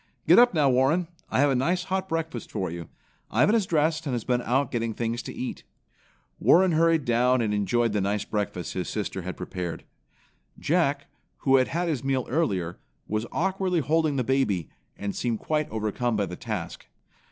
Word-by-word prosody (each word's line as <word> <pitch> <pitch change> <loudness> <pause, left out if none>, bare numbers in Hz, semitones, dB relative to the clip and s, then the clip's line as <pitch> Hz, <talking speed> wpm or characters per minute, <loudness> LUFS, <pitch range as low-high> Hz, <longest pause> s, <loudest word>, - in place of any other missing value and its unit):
Get - - +8
up 245 -5 +5
now, 150 -3 +4
Warren, 135 +7 +2 0.2
I - - +2
have 145 -1 +4
a - - +2
nice 175 +8 +1
hot 190 0 -2
breakfast 160 -7 -3
for 95 -5 -3
you. 85 -1 -7 0.4
Ivan 210 - +3
is 220 -5 +2
dressed 155 0 +1
and 135 - -1
has 120 - -3
been 125 -1 +1
out 130 +4 0
getting 115 -2 -2
things 115 +1 -2
to - - -7
eat." 125 - -5 0.8
Warren 185 +1 +5
hurried 165 -2 +3
down 125 +1 +3
and 110 -3 0
enjoyed 115 +2 +1
the 105 - +1
nice 100 +2 -1
breakfast 100 -4 -3
his 90 -1 -3
sister 100 -3 -3
had 90 +1 -6
prepared. 90 -2 -5 0.7
Jack, 145 -4 +1 0.4
who 135 -1 +6
had 130 - +3
had 175 +1 -1
his 150 -7 -1
meal 135 -2 0
earlier, 95 - -1 0.3
was 110 +2 -2
awkwardly 190 0 0
holding 155 +1 +1
the 130 - +1
baby, 115 - 0 0.3
and 100 -1 -4
seemed 120 -2 -1
quite 155 +5 -1
overcome 110 +2 -1
by 105 -1 +1
the 90 - -7
task. - - -5
130 Hz, 185 wpm, -26 LUFS, 105-160 Hz, 0.8 s, Get